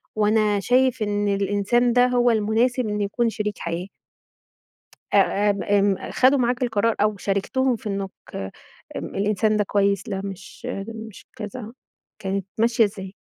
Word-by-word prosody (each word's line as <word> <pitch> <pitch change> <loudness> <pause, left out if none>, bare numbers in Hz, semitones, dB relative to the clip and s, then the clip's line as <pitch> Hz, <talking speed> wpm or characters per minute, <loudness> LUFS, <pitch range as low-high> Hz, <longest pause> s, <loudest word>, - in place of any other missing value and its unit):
وأنا 210 -1 +2
شايف 250 +2 +2
إن 205 0 0
الإنسان 205 +4 +1
ده 245 +1 +5
هو 245 -1 +3
المناسب 225 +3 +1
إن 210 0 -2
يكون 230 +4 0
شريك 210 -2 -3
حياة. 170 +2 -4 1.3
آآ، 205 +1 +3
آمم، 200 -1 0
آمم 200 -1 +1
خدوا 265 +2 +4
معاك 245 0 +1
القرار 225 -1 +1
أو 210 0 +2
شاركتهم 220 +7 0
في 215 - -6
إنك 195 -1 -3 0.9
امم - - -6
الإنسان 210 +2 +1
ده 210 - +2
كويس، 200 +1 +1
لأ، 195 -2 -2
مش 195 +5 -8 0.3
مش 220 -2 -10
كذا، 215 +2 -7 0.5
كانت 195 -1 -3
ماشية 230 0 +4
ازاي؟ 195 -2 -5
210 Hz, 145 wpm, -23 LUFS, 200-235 Hz, 1.3 s, ده